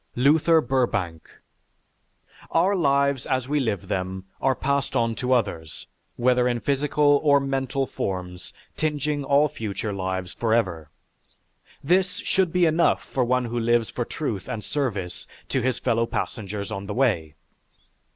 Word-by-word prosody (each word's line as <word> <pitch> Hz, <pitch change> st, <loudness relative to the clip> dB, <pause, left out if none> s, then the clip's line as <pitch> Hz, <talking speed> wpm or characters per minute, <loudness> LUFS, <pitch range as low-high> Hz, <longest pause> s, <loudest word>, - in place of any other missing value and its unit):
LUTHER 155 Hz, +5 st, +4 dB
BURBANK 115 Hz, -, -1 dB, 1.2 s
Our 200 Hz, +2 st, +3 dB
lives 140 Hz, -5 st, +2 dB
as 130 Hz, -2 st, 0 dB
we 150 Hz, +1 st, +1 dB
live 110 Hz, -8 st, -2 dB
them 95 Hz, 0 st, -3 dB, 0.2 s
are 135 Hz, -1 st, +2 dB
passed 140 Hz, +1 st, -1 dB
on 115 Hz, -1 st, +2 dB
to 125 Hz, 0 st, -2 dB
others, 80 Hz, -, -1 dB, 0.3 s
whether 125 Hz, 0 st, +3 dB
in 120 Hz, -1 st, 0 dB
physical 145 Hz, +3 st, +2 dB
or 145 Hz, -2 st, +5 dB
mental 135 Hz, 0 st, -1 dB
forms 90 Hz, -6 st, -5 dB, 0.2 s
tinging 150 Hz, -1 st, -1 dB
all 140 Hz, +2 st, +4 dB
future 105 Hz, -4 st, -4 dB
lives 95 Hz, -1 st, -3 dB
forever. 95 Hz, -10 st, 0 dB, 0.9 s
This 180 Hz, +4 st, +2 dB
should 190 Hz, -3 st, +1 dB
be 180 Hz, 0 st, +3 dB
enough 165 Hz, +1 st, +2 dB
for 130 Hz, -, -1 dB
one 125 Hz, +1 st, +1 dB
who 120 Hz, +1 st, -2 dB
lives 120 Hz, 0 st, +1 dB
for 120 Hz, -, -2 dB
truth 115 Hz, -, -4 dB
and 115 Hz, -4 st, -4 dB
service 105 Hz, -11 st, -3 dB, 0.2 s
to 130 Hz, -, 0 dB
his 125 Hz, 0 st, 0 dB
fellow 115 Hz, -2 st, +1 dB
passengers 105 Hz, -3 st, -4 dB
on 100 Hz, -2 st, -5 dB
the 100 Hz, -, -4 dB
way. 95 Hz, -, +1 dB
125 Hz, 140 wpm, -24 LUFS, 100-140 Hz, 1.2 s, or